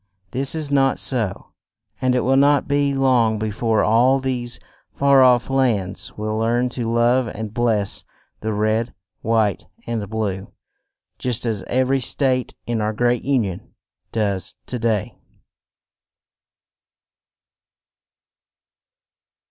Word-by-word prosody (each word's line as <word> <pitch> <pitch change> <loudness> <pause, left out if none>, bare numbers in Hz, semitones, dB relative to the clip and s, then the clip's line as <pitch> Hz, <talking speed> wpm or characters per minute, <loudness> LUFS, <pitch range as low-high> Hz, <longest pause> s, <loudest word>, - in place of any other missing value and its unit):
This 135 +4 -1
is 155 -3 -3
not 135 -1 +3
so, 115 -8 -2 0.5
and 130 0 +2
it 125 - +2
will 135 +1 +2
not 140 +1 +4
be 145 0 +2
long 125 -5 +3
be 110 0 -2
fore 110 0 +1
all 120 +5 +4
these 125 -3 -3 0.3
far 140 -1 +4
off 125 -2 +5
lands 115 -9 -1
will 110 +1 -2
learn 120 +2 +1
to 120 -2 -3
love 120 +2 +2
and 110 -1 -6
bless 110 -4 0 0.4
the 110 - -3
Red, 110 +2 0 0.3
White 110 -4 +1 0.2
and 110 -4 -3
Blue, 100 -3 -3 0.7
just 125 -2 -2
as 110 -4 -1
ev 130 +1 +1
er - - +3
y 135 - +3
State 130 0 0
in 115 -2 -1
our 105 +1 -1
great 120 +1 +1
Un 130 -4 +2
ion 95 -3 -7 0.4
does 100 -5 -2
to 125 - -4
day. 110 -3 -1
120 Hz, 130 wpm, -21 LUFS, 110-130 Hz, 0.7 s, off